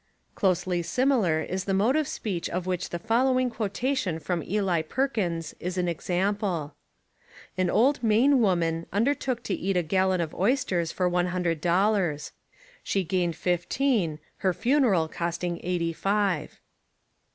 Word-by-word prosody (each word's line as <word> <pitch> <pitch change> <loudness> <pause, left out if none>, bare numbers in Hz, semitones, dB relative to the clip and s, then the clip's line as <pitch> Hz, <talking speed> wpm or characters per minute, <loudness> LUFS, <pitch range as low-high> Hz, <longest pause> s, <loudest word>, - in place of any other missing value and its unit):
Closely 185 -2 +1
sim 250 +11 +1
ilar 170 - +1
is 185 0 -3
the 195 - 0
mode 220 +8 +3
of 310 -2 +1
speech 185 -6 -3
of 180 +1 -3
which 185 -1 -2
the 175 - -3
follow 240 +8 +2
ing 255 -1 0
quotation 225 -3 -1
from 170 +1 -2
Eli 190 -2 0
Perkins 175 - -2
is 180 +1 -4
an 180 -1 0
example: 180 -2 -1 0.8
"An 185 -1 +1
old 265 +9 +3
Maine 245 +5 +4
woman 170 -6 +1
undertook 250 +2 0
to 200 - -2
eat 190 0 -1
a 175 - +2
gal 190 +4 +1
lon 185 -1 +1
of 165 -2 -2
oysters 195 -6 0
for 180 - 0
one 180 0 +1
hundred 175 -3 -1
dollars. 175 -4 +1 0.5
She 195 - -1
gained 175 -1 0
fifteen, 180 - 0 0.2
her 185 -3 0
funeral 235 - +2
costing 170 +1 -3
eighty 170 -2 -1
five." 195 -3 -1
185 Hz, 150 wpm, -26 LUFS, 170-220 Hz, 0.8 s, Maine